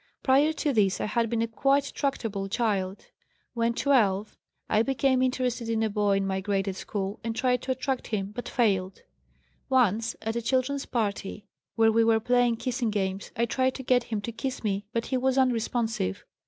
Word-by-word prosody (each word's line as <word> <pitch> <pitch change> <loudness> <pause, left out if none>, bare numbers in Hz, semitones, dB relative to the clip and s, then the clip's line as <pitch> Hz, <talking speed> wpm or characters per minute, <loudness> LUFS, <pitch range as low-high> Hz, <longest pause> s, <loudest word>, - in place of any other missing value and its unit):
Prior 280 +4 +4
to 295 -2 -1
this 200 -4 +2
I - - -1
had 230 +1 0
been 230 0 0
a - - -1
quite 275 +5 +1
tractable 220 -8 -2
child. 200 -4 -1 0.5
When 235 0 0
12 215 -8 +2 0.3
I 215 - +3
became 265 +1 +2
interested 250 -2 -1
in 225 -1 +1
a 220 - 0
boy 205 -1 +2
in 195 - 0
my 190 0 -1
grade 195 0 -1
at 190 - -2
school, 195 +1 -4
and 225 0 -3
tried 250 0 +1
to 260 - -3
attract 260 0 -2
him, 200 -2 -2
but 245 +3 -6
failed. 195 -6 0 0.7
Once 230 -4 +2
at 225 +1 -2
a 235 - -1
children's 260 +4 0
party 205 -3 -3 0.3
where 225 -1 +4
we 225 +1 +4
were 225 0 +4
playing 245 +1 +2
kissing 245 -1 -1
games 195 -2 -2
I 235 - +1
tried 260 +2 0
to 265 - -6
get 245 -1 +2
him 215 -3 -3
to 235 - -5
kiss 255 +3 -4
me, 200 -1 -2
but 230 0 -1
he 260 - -1
was 260 +1 +1
unresponsive. 230 - 0
230 Hz, 195 wpm, -27 LUFS, 205-255 Hz, 0.7 s, Prior